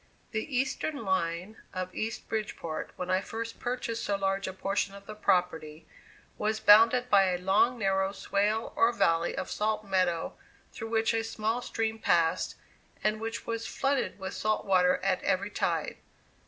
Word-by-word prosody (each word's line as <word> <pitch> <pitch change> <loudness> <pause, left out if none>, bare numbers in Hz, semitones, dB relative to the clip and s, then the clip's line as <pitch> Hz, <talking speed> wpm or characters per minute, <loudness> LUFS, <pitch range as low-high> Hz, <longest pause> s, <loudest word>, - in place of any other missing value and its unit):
The 235 +5 -2
eastern 270 0 -1
line 185 +2 -1 0.2
of 185 0 -4
East 225 +1 -4
Bridgeport, 205 -7 -4
when 180 0 -4
I 185 +1 +3
first 230 +2 -6
purchased 240 -2 -3
so 200 - 0
large 195 0 -1
a - - -2
portion 195 +1 -1
of 200 0 -12
the 215 - -7
property, 175 -6 0 0.5
was 215 +1 0
bounded 225 +4 +6
by 200 -4 +5
a 180 -1 +1
long, 195 +7 +3
narrow 195 -2 +1
swale 205 +3 -1
or 230 - +4
valley 165 -7 +1
of - - -4
salt 215 0 -1
meadow, 185 -4 0 0.4
through 225 -1 -6
which 225 0 +2
a 225 0 0
small 225 +1 -2
stream 225 -2 -2
passed, 165 -5 +2 0.5
and 215 +1 +1
which 225 +1 -4
was 230 -1 -3
flooded 275 -1 -1
with 190 -1 -5
salt 215 0 -1
water 180 -2 +4
at 195 -1 +1
every 200 +2 0
tide. - - -1
210 Hz, 165 wpm, -29 LUFS, 190-225 Hz, 0.5 s, bounded